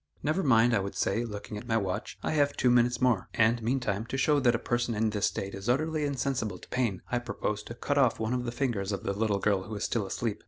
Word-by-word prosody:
"Never 155 +6 +1
mind," 120 -6 +4
I 110 - +3
would 100 0 -4
say, 110 +5 0
looking 105 -2 -6
at 120 - -12
my 115 -1 +2
watch; 100 +1 -3
"I - - 0
have 145 -2 +1
two 125 - +3
minutes 120 0 +3
more, 115 -7 +2
and 115 +1 +3
meantime, 115 -3 -1
to 135 - -3
show 145 +2 +3
that 120 -3 +3
a - - +2
person 120 0 -1
in 110 +1 +1
this 105 -1 +1
state 100 0 -4
is 100 +3 -5
utterly 155 +4 +1
insensible 130 -8 -1
to - - -14
pain, 115 -7 -1
I 125 - +1
propose 105 -3 -3
to 115 - -9
cut 145 +3 0
off 130 -5 +3
one 110 +2 -1
of 125 -1 -1
the 120 - -2
fingers 120 -6 -1
of 100 - -3
the 100 - -1
little 105 0 +1
girl 100 -1 +1
who 110 +3 -7
is 105 - -4
still 110 -5 -1
asleep." 110 +1 -2
115 Hz, 265 wpm, -29 LUFS, 105-125 Hz, -, mind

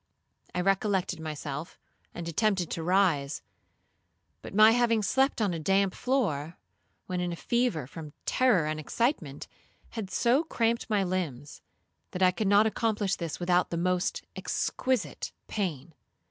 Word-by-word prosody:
I 180 - +1
recollected 195 -2 +1
myself, 155 0 -5 0.3
and 170 -1 -6
attempted 185 0 +1
to 165 - -3
rise; 165 -5 +1 1.0
but - - -9
my 215 +1 +8
having 230 -2 +2
slept 265 +6 +2
on 205 -5 +1
a 165 - -3
damp 195 +4 +2
floor, 175 - -1 0.5
when 180 -1 -3
in 180 0 -1
a - - -3
fever 235 - 0
from 150 +2 -9
terror 245 -11 +3
and 155 0 -2
excitement, 155 - -1 0.4
had 220 -5 -5
so 245 - +2
cramped 235 -6 0
my 210 -2 +2
limbs, 165 -7 -3 0.5
that 185 - 0
I 185 - +6
could 210 +2 -2
not 205 +2 +6
accomplish 215 -3 0
this 170 -3 -5
without 180 0 +2
the 170 - -2
most 180 +1 0
exquisite 260 -1 -2
pain. 170 -7 -3
185 Hz, 145 wpm, -29 LUFS, 165-220 Hz, 1.0 s, my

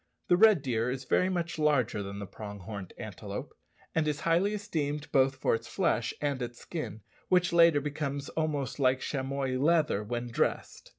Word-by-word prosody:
The 175 - +6
red 205 -5 +6
deer 120 -3 0
is 130 +1 -4
very 185 - +2
much 170 -3 -2
larger 140 -8 +2
than 100 0 -6
the 100 - -5
prong 100 +1 -8
horned 100 0 -7
antelope, - - -6 0.4
and 160 -1 +1
is 150 -1 -1
highly 180 +5 +2
esteemed 150 -8 -3
both 135 0 +4
for 130 - +1
its 115 +1 -2
flesh 125 - 0
and 140 -3 -1
its 120 -1 -5
skin, 115 - -6 0.3
which 180 -1 +3
latter 165 -3 +6
becomes 145 -1 -3
almost 150 -5 -2
like 130 -1 +3
chamois 135 -1 -2
leather 150 -7 +2
when 120 +2 -3
dressed. - - -2
140 Hz, 175 wpm, -30 LUFS, 120-160 Hz, 0.4 s, The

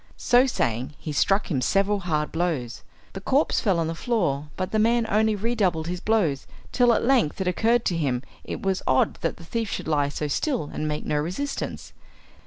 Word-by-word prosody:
So 250 +2 +4
saying 125 - -1
he 155 - -6
struck 195 +7 +1
him 135 -5 0
several 200 +7 +2
hard 155 -5 -1
blows. 160 -9 -2 0.3
The 195 - -6
corpse 275 +9 +2
fell 195 -5 +2
on 165 - +1
the 165 - -2
floor, 165 - -1
but 185 -1 -3
the 215 - +1
man 230 +1 +3
only 215 +1 +2
redoubled 200 -7 0
his 175 +1 -3
blows, 180 -12 0 0.2
till 245 -1 +4
at - - 0
length 245 - +2
it 190 - -1
occurred 230 +6 +2
to 175 - +1
him 135 -6 -1 0.2
it - - -6
was 190 -1 0
odd 130 - +2
that - - -1
the 170 - -12
thief 225 +4 -2
should - - -4
lie 145 -2 +1
so 150 +1 -3
still 235 - -1
and 155 - -2
make 150 0 -3
no 150 - 0
resistance. 185 - -4
180 Hz, 200 wpm, -25 LUFS, 150-220 Hz, 0.3 s, So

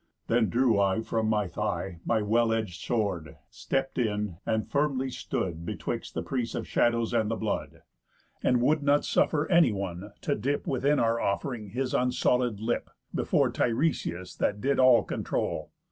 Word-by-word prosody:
Then 115 -3 +2
drew 120 -1 +3
I 100 +2 +2
from 110 -1 -1
my 105 -2 +2
thigh 95 -1 -3
My 110 -2 +1
well 115 +3 +3
edg'd 110 -4 -1
sword, 95 -6 -2 0.2
stept 135 -1 -2
in, 105 -6 -1
and 110 0 0
firmly 140 -3 0
stood 85 -8 -3
Betwixt - - -4
the 80 - -2
prease 115 +6 -2
of - - -4
shadows 115 -1 +1
and 110 -1 +2
the 115 - 0
blood, 110 -1 -3 0.6
And 125 -1 +2
would 155 +3 +3
not 145 0 +3
suffer 155 -1 +2
anyone 100 - +2
to - - 0
dip 140 +7 -1
Within 140 +3 +1
our 115 -1 +2
off'ring 105 +1 -2
his 125 +4 -2
unsolid 125 -3 +1
lip, 115 +2 -2 0.2
Before - - +2
Tiresias 115 - -1
that 105 - 0
did 140 +5 +1
all 130 -2 +6
controul. - - -3
115 Hz, 160 wpm, -28 LUFS, 105-130 Hz, 0.6 s, all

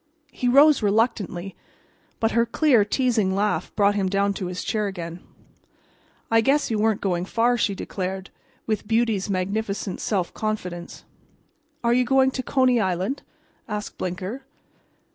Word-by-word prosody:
He 250 - -2
rose 285 +3 +6
reluctantly, 200 -3 0 0.6
but 225 0 +1
her 235 - +3
clear, 245 -2 +3
teasing 215 -4 +1
laugh 210 +1 0
brought 205 -1 +4
him 195 -2 0
down 200 +1 +1
to 190 -2 -4
his 180 0 -5
chair 215 -2 -1
again. 170 -3 -6 1.1
"I 225 0 +5
guess 275 +3 +2
you 215 - 0
weren't 220 -1 +1
going 180 -3 0
far," 235 +4 +2
she 210 -4 0
declared, 190 0 -5 0.3
with 215 -2 -2
beauty's 225 -3 +1
magnificent 200 +1 -2
self 190 -5 -1
confidence. 180 -5 -4 0.8
"Are 235 0 +3
you 250 +1 +3
going 265 +1 +3
to 260 - -3
Coney 255 -2 +2
Island?" 190 +6 -1 0.5
asked 210 -1 -5
Blinker. 185 +8 -4
210 Hz, 145 wpm, -24 LUFS, 190-235 Hz, 1.1 s, rose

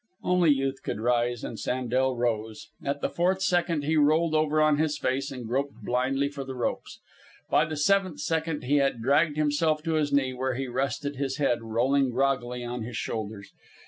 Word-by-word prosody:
Only 180 -2 +3
Youth 135 -1 +1
could - - -4
rise, 120 0 0
and 115 - -6
Sandel 130 +1 0
rose. 110 -2 -2
At 140 +1 -2
the - - 0
fourth 185 +2 +1
second 175 -5 +1
he 155 +2 +1
rolled 155 +2 +3
over 155 0 +2
on 155 -1 +4
his 155 -2 +1
face 135 0 -1
and 125 -3 -7
groped 140 +4 -2
blindly 130 +3 0
for 140 -1 -6
the 135 0 -7
ropes. 125 - -3 0.5
By 155 - +4
the 155 0 -5
seventh 185 +1 +2
second 160 -2 -1
he 140 +4 +2
had 135 -5 +1
dragged 145 +4 +3
himself 155 +1 +1
to 165 -1 -1
his 150 -2 +1
knee, 135 -2 +2
where 130 0 -2
he 135 +1 -3
rested, 135 +3 -2
his 135 -1 -2
head 120 -5 +1
rolling 125 +5 +1
groggily 125 -1 0
on 120 0 -4
his 115 0 -5
shoulders. 105 -3 -5
135 Hz, 190 wpm, -27 LUFS, 125-155 Hz, 0.5 s, on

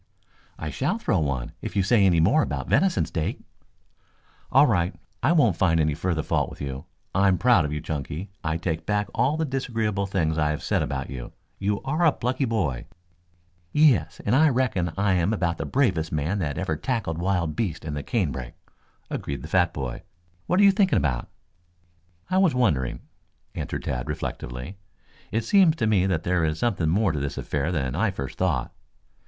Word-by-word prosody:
"I 80 -1 -5
shall 165 +11 -1
throw 115 - +1
one 70 -5 -2
if - - -6
you 100 - +3
say 105 +1 +4
any 85 -3 +3
more 110 - +4
about - - -3
venison 190 -1 +2
steak." 80 -2 -3 1.1
"All - - +7
right. 85 +2 +1 0.3
I 130 - +3
won't 120 - +3
find 80 -3 +3
any 75 -1 +2
further 80 0 -1
fault - - 0
with - - -12
you. 70 -1 -5 0.3
I 95 +2 +3
am 95 -1 +3
proud 120 -8 +4
of 75 - -3
you, 75 0 -3
Chunky. 80 +6 -5
I 80 0 0
take 80 -2 -3
back 105 -1 0
all 150 - +1
the 160 - 0
disagreeable 115 -7 -1
things 80 -5 0
I 75 -1 +2
have 75 - -3
said - - +1
about 70 0 -3
you. 65 -3 -7 0.3
You 100 +1 -1
are 155 +6 0
a 160 - +6
plucky 130 +1 -1
boy." 90 - -1 0.9
"Yes, 120 - +3
I 140 +9 +5
reckon 120 - 0
I 100 -1 +2
am 90 +3 +2
about 85 -5 -1
the - - -3
bravest 90 - +1
man 75 +7 -1
that 75 -6 -2
ever 90 -4 -1
tackled 95 - -2
wild 85 -4 0
beasts 90 -9 -2
in 75 - -4
the 75 - -3
canebrake," 70 - -2 0.6
agreed 70 - -4
the - - -6
fat 90 0 +2
boy. 65 -5 -5 0.5
"What 180 +3 +2
are - - +6
you 200 - +8
thinking 195 -2 +3
about?" 60 -5 -1 1.0
"I 185 - +2
was 185 -8 +3
wondering," 75 - +1 0.5
answered - - -4
Tad 65 +4 -3
reflectively. 65 +2 -5 0.5
"It 115 +1 0
seems 190 -6 +5
to 155 - -1
me 100 -4 +3
that 85 -4 0
there 90 -1 +1
is 75 -1 0
something 95 -9 0
more 100 +3 +2
to 75 - -2
this 70 0 -4
affair 75 +3 -2
than 65 -7 -1
I - - +2
first 70 -1 -6
thought. 80 -10 0
90 Hz, 190 wpm, -25 LUFS, 75-115 Hz, 1.1 s, you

